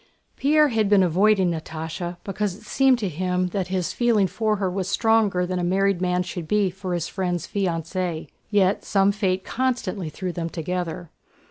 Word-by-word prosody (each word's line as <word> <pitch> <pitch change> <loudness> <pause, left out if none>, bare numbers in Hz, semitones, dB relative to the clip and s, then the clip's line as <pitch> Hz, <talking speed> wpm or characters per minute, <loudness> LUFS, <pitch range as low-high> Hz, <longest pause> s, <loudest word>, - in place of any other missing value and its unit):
Pierre 300 +2 +4
had 220 -4 +1
been 200 -2 +5
avoiding 190 +1 +3
Natásha 165 +2 -5
because 195 -1 -2
it 215 - -16
seemed 265 +3 +3
to 215 -4 -2
him 180 +2 -1
that 185 0 -2
his 185 -2 -2
feeling 235 -5 +3
for 215 +3 0
her 195 -2 -1
was 185 0 -2
stronger 215 -4 +2
than 180 0 -2
a - - -1
married 190 +1 +1
man's 180 0 +1
should 175 -3 -6
be 205 0 +2
for 185 -1 -4
his 170 -1 -2
friend's 180 -2 -2
fiancée. 175 -2 -2 0.2
Yet 200 -2 +2
some 195 0 +3
fate 190 -2 -1
constantly 230 -9 -2
threw 180 +4 -4
them 170 -1 -4
together. 175 0 -4
185 Hz, 175 wpm, -24 LUFS, 175-205 Hz, 0.2 s, been